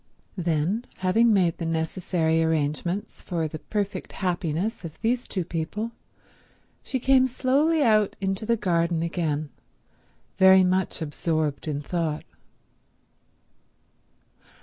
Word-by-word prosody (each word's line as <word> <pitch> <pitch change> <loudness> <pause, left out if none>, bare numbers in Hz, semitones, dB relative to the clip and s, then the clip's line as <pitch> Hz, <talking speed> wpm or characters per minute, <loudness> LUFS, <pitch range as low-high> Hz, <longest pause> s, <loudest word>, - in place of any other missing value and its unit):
Then, 175 +7 0
having 225 +6 +3
made 180 -5 +2
the 165 - -3
necessary 165 0 0
arrangements 160 +4 -1
for 165 -3 -2
the 155 +1 -7
perfect 205 +2 -3
happiness 180 +3 -2
of 160 -2 -8
these 240 +2 0
two 185 -4 -2
people, 175 +8 -3 0.9
she 265 - -3
came 260 +1 +4
slowly 285 +5 +2
out 215 -4 +3
into 195 +1 -2
the 230 +1 +1
garden 170 -3 +1
again, 155 -3 -2 0.9
very 190 0 +8
much 185 -2 0
absorbed 155 -1 -2
in 145 -1 -2
thought. 160 -1 -2
180 Hz, 110 wpm, -25 LUFS, 160-210 Hz, 0.9 s, very